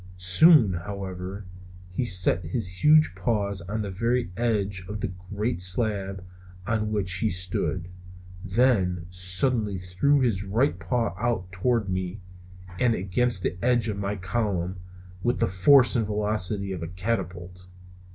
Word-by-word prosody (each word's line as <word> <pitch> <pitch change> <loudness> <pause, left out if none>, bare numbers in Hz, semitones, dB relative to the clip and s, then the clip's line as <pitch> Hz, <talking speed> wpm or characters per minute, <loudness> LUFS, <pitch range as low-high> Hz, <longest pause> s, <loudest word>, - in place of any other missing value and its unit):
Soon, 100 - +6
however, 95 +1 -6 0.5
he 90 - -2
set 90 -4 +2
his 90 +1 -3
huge 155 -5 +5
paws 100 0 -1
on 105 +5 -4
the 100 - -5
very 115 +2 -1
edge 105 -5 -1
of 105 0 -5
the 90 - -3 0.2
great 105 -1 -2
slab 95 0 0 0.4
on 110 0 -1
which 100 -4 -1
he 110 - +1
stood, 90 -1 -1 0.5
and 95 0 -10
then 95 -7 +2
suddenly 95 +4 +1
threw 95 +11 +1
his 115 -7 0
right 105 +1 0
paw 100 +3 -1
out 105 -6 -2
toward 105 +4 0
me 95 +1 -3 0.6
and 120 -2 +3
against 95 +2 +1
the - - -1
edge 120 -2 +2
of 100 -1 -3
my 100 +1 -2
column 95 -2 -2 0.4
with 120 +5 0
the - - +2
force 120 +9 +5
and 115 -3 +1
velocity 105 -2 -1
of 90 -3 -5
a 85 - -4
catapult! 90 -1 -4
100 Hz, 145 wpm, -25 LUFS, 90-115 Hz, 0.6 s, Soon